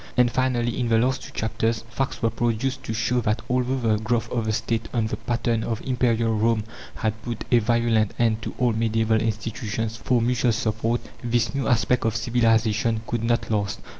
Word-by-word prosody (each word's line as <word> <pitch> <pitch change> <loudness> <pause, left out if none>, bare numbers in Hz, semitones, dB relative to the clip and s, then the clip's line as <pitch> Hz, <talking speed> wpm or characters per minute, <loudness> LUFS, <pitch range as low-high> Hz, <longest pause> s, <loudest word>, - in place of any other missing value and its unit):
And 125 -1 +4
finally, 120 -1 0
in 120 -2 0
the 115 - +4
last 130 +3 +1
two - - -10
chapters 110 +1 -1
facts 135 -1 -3
were 115 - +3
produced 120 +3 -1
to 110 - -3
show 120 +2 +1
that 105 0 -1
although 125 +1 +1
the 115 -4 +1
growth 110 +2 -1
of 115 -3 -1
the 110 - 0
State 115 +1 -2
on 115 -2 +2
the 110 - -2
pattern 115 0 -1
of 115 -2 -2
Imperial 115 -3 +1
Rome 110 0 +2 0.3
had 110 -1 -2
put 115 -1 -5
a 120 - +6
violent 115 -2 +1
end 115 -2 +2
to - - -6
all 125 -2 +2
medieval 110 0 +1
institutions 110 0 -3
for 125 +2 +1
mutual 120 0 +2
support, 115 +2 -1 0.2
this 120 0 +1
new 140 -1 -1
aspect 125 0 +2
of 115 -1 0
civilization 115 -1 +2
could 115 -1 -2
not 115 0 0
last. 100 -2 -1
115 Hz, 195 wpm, -24 LUFS, 110-120 Hz, 0.3 s, a